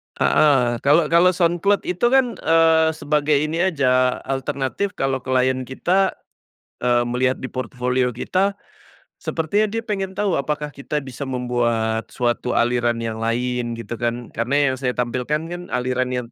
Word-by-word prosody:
Heeh, 125 -6 +3
kalau 150 +5 +3
kalau 175 +2 +5
SoundCloud 175 +3 +2
itu 180 +6 0
kan, 255 -1 +2
eee, 160 0 +4
sebagai 150 0 +1
ini 155 +3 0
aja, 130 -6 +2
alternatif 135 +8 -2
kalau 135 -1 -1
klien 130 0 0
kita, 185 +8 +1 0.7
eee, 120 -1 +3
melihat 125 +2 0
di 130 - -5
portofolio 125 -1 -1
kita, 190 - 0 0.7
sepertinya 200 +7 0
dia 225 +2 -3
pengen 195 -3 -3
tahu 200 -5 0
apakah 150 +1 -3
kita 145 +1 -4
bisa 135 +1 -7
membuat 120 -3 -1
suatu 120 0 -1
aliran 120 -1 +1
yang 110 -1 -4
lain, 120 +1 -1
gitu 115 0 -7
kan. 120 0 -3
Karena 140 +4 +1
yang - - -2
saya 125 -2 -1
tampilkan 125 +5 -1
kan 175 0 -5
alirannya 125 -1 -2
130 Hz, 145 wpm, -21 LUFS, 125-160 Hz, 0.7 s, kalau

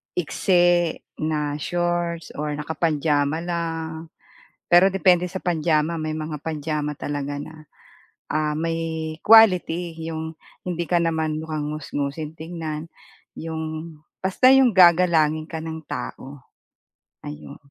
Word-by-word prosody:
iksi 175 0 +2 0.3
na 150 -2 -1
shorts 175 0 -2
or 150 0 -2
naka-pajama 150 0 0
lang, 165 -2 -4 0.6
pero 175 +2 +7
depende 180 -2 +4
sa 190 +1 -6
pajama. 165 -1 +1
May 155 0 -3
mga 155 -1 -4
pajama 150 -1 -3
talaga 145 0 -4
na, 155 +2 -10 0.8
ah, 155 0 0
may 160 0 -3
quality. 180 -6 +5
'Yong 160 0 -5 0.3
hindi 175 -1 -2
ka 175 0 +2
naman 160 -2 -1
mukhang 155 -2 -3
ngusngusin 150 +1 -4
tingnan, 160 -1 -5 0.5
'yong 160 0 -5 0.3
basta 195 +8 +4
'yong 265 -2 +6
gagalangin 165 -3 +5
ka 160 - -4
ng 160 0 -6
tao. 130 +2 -7 0.8
Ayun. 75 -1 -8
160 Hz, 110 wpm, -23 LUFS, 150-170 Hz, 0.8 s, pero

